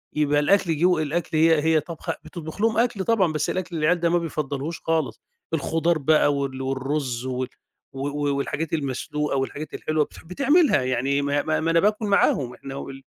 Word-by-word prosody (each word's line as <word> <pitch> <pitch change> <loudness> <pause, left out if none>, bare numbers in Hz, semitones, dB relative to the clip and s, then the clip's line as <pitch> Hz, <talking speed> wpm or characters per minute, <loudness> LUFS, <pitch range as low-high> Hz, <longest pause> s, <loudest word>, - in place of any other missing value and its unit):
يبقى 145 -1 +2
الأكْل 165 +1 +2
جوّه 175 0 +3
الأكل 155 +1 -2
هي 160 -1 +5
هي 160 0 +4
طابخة، 165 +1 -5
بتطبُخ 160 +2 -8
لهم 225 0 +2
أكْل 230 -4 +1
طبعًا 190 -7 +2
بس 155 0 -1
الأكْل 180 -2 -3
العيال 165 +3 +2
ده 170 0 +2
ما 175 - +3
بيفضّلهوش 155 -2 -3
خالص، 160 -3 -1 0.3
الخضار 165 +2 +1
بقى 145 0 +3
وال 135 -1 -3
والرز 130 -1 -2
وال 130 0 -2 0.5
و 135 +1 -3
و 145 0 -1
والحاجات 150 +3 -3
المسلوقة 150 0 -2
والحاجات 145 +3 -4
الحلوة 155 -1 0
بتح - - -15
بتعملها 280 - +3
يعني 130 +3 0
ما 145 +1 +1
ما 155 0 0
ما 165 +1 0
أنا 165 - +4
باكل 210 +3 +1
معاهم، 140 -10 +2
إحنا 135 +2 -9
وال 135 0 -8
155 Hz, 180 wpm, -24 LUFS, 140-170 Hz, 0.5 s, هي